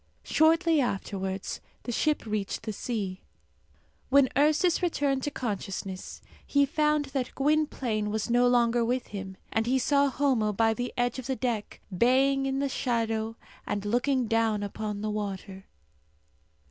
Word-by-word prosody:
Shortly 325 0 +3
afterwards 195 -4 -3 0.2
the 240 - -4
ship 300 +4 0
reached 210 -2 -3
the 220 - -4
sea. 200 -4 -4 0.9
When 270 -1 +5
Ursus 305 +6 +3
returned 285 -6 +1
to 290 - -1
consciousness, 195 -7 -5 0.2
he 285 0 +3
found 300 0 +1
that 260 -3 -2
Gwynplaine 270 -7 0
was 215 0 -2
no 245 +1 +4
longer 240 -1 +3
with 245 +2 -1
him, 190 -2 -7 0.2
and 225 +1 +1
he 260 +2 +3
saw 280 +2 +3
Homo 250 -6 +1
by 225 +2 +3
the 245 +2 -3
edge 245 +1 0
of 255 - -7
the 265 - 0
deck 235 -5 -3
baying 270 +5 +3
in 270 0 -1
the 280 +1 +1
shadow 225 -4 -1 0.3
and 205 0 -2
looking 245 +4 +1
down 225 -2 +1
upon 205 0 -4
the 215 0 -2
water. 195 -2 -5
240 Hz, 145 wpm, -28 LUFS, 210-275 Hz, 0.9 s, When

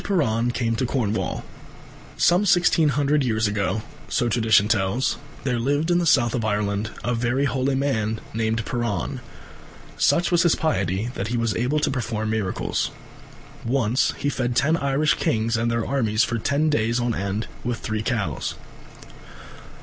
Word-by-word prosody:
PIRAN 125 - +1
CAME 115 -2 -1
TO 120 +3 -1
CORNWALL 110 -5 -1 0.7
Some 175 +3 +4
sixteen 170 -3 +4
hundred 145 0 +2
years 110 -3 +1
ago, 100 0 -1 0.3
so 120 - +1
tradition 110 -2 +3
tells, 110 +5 +1 0.3
there 125 -3 0
lived 145 +7 0
in 175 - +3
the 170 - 0
South 120 -6 +4
of 120 - -1
Ireland 105 0 -1
a 120 - 0
very 120 +4 0
holy 135 0 0
man 110 -6 0
named 110 0 -1
Piran. 120 -8 -2 0.8
Such 175 +1 +3
was 175 -1 +4
his 170 -1 +4
piety 100 - -1
that 100 - -3
he 120 +1 -1
was 115 -4 0
able 125 +6 +1
to - - +1
perform 110 -4 -2
miracles. 105 -4 -1 0.7
Once 125 0 +1
he - - -2
fed 125 -2 -2
ten 155 +6 +3
Irish 140 0 +1
kings 115 +1 0
and 115 +1 0
their 115 -1 -1
armies 115 -5 +1
for 120 -2 -1
ten 145 +6 +1
days 115 -3 +1
on 120 -1 0
end 100 +2 -2 0.2
with 120 -1 -2
three 110 0 -3
cows. 110 - -2
120 Hz, 160 wpm, -23 LUFS, 110-140 Hz, 0.8 s, Some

